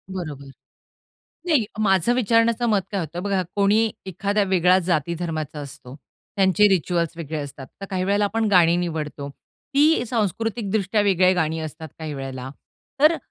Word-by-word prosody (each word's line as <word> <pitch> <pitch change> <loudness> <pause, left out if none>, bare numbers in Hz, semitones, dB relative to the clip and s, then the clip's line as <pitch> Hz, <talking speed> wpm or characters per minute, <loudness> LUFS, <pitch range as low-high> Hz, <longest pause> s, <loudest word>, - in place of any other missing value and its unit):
बरोबर. 145 -6 -6 1.0
नाही 300 -10 +3 0.2
माझं 195 +3 +3
विचारण्याचं 230 0 +2
मत 205 -3 +3
काय 195 - -1
होत 165 0 -6
बघा, 195 -2 0
कोणी 210 +3 +3 0.2
एखाद्या 200 +3 -1
वेगळ्या 185 -1 +4
जाती 170 -1 0
धर्माचा 155 -3 -4
असतो, 135 -2 -10 0.4
त्यांचे 195 +2 +4
रिच्युअल्स 170 -2 0
वेगळे 160 -2 -5
असतात. 140 -2 -7
तर 195 - -6
काही 185 -1 -1
वेळेला 205 +2 +2
आपण 225 +2 0
गाणी 175 -3 +5
निवडतो. 155 -5 -4 0.5
ती 300 -2 +4
सांस्कृतिकदृष्ट्या 215 -2 -1
वेगळ्या 185 -2 +4
गाणी 160 -2 0
असतात 155 0 -7
काही 155 -2 -5
वेळेला. 135 -1 -6 0.5
तर 305 +3 +7
अ, - - -2
185 Hz, 150 wpm, -23 LUFS, 160-210 Hz, 1.0 s, तर